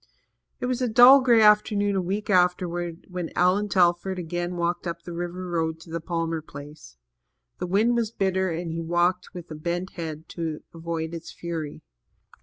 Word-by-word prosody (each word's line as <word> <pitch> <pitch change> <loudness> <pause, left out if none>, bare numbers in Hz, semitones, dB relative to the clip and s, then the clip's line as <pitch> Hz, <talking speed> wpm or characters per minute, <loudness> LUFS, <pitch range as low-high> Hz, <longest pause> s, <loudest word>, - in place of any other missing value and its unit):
It - - -3
was 255 0 -1
a 250 - +2
dull 245 +4 +8
grey 235 -3 +5
afternoon 210 -1 +4
a 190 - +1
week 195 +4 -3
afterwards 180 -2 0
when 180 -3 -5
Allan 190 +4 +2
Telford 180 0 +2
again 175 +1 -3
walked 175 +1 -1
up 170 0 -5
the 175 - -7
river 175 +2 -5
road 160 -2 -1
to 165 - -13
the 165 0 -3
Palmer 165 -1 -2
place. 145 - -12 0.6
The 180 - -3
wind 215 +6 +2
was 230 -2 0
bitter 190 -3 0
and 165 0 -3
he 165 +1 -3
walked 175 +3 0
with 175 -2 -7 0.2
bent 175 +3 -2
head 160 -2 -6
to 160 -3 -4
avoid 165 0 -4
its 165 0 -7
fury. 165 -3 -6
175 Hz, 175 wpm, -25 LUFS, 165-190 Hz, 0.6 s, dull